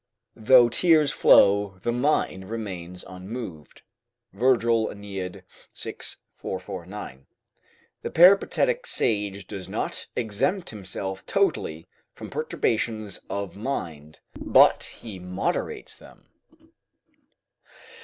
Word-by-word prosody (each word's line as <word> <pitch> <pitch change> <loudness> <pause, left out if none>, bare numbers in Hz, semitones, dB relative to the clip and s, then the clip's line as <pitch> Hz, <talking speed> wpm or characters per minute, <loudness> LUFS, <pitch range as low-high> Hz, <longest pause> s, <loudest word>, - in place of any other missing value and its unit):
["Though 125 +1 +7
tears 155 +4 +4
flow, 100 -4 +5
the 120 - +1
mind 120 -7 0
remains 90 -6 -6
unmoved." 95 -4 -8 0.5
Virgil, 115 0 +3
AEneid, 95 -3 -7 0.4
iv. - - -6 0.2
449] 95 -6 -7 0.7
The - - -4
Peripatetic 200 - +4
sage 100 -4 0
does 95 -1 -8
not - - -3
exempt 125 - -1
himself 95 -2 -5
totally 80 +1 0 0.3
from - - -10
perturbations 110 -3 -1
of 100 -2 -4
mind, 80 - -5
but - - +5
he 105 -5 -10
moderates 100 - -3
them. - - -18
100 Hz, 90 wpm, -25 LUFS, 95-120 Hz, 0.7 s, Though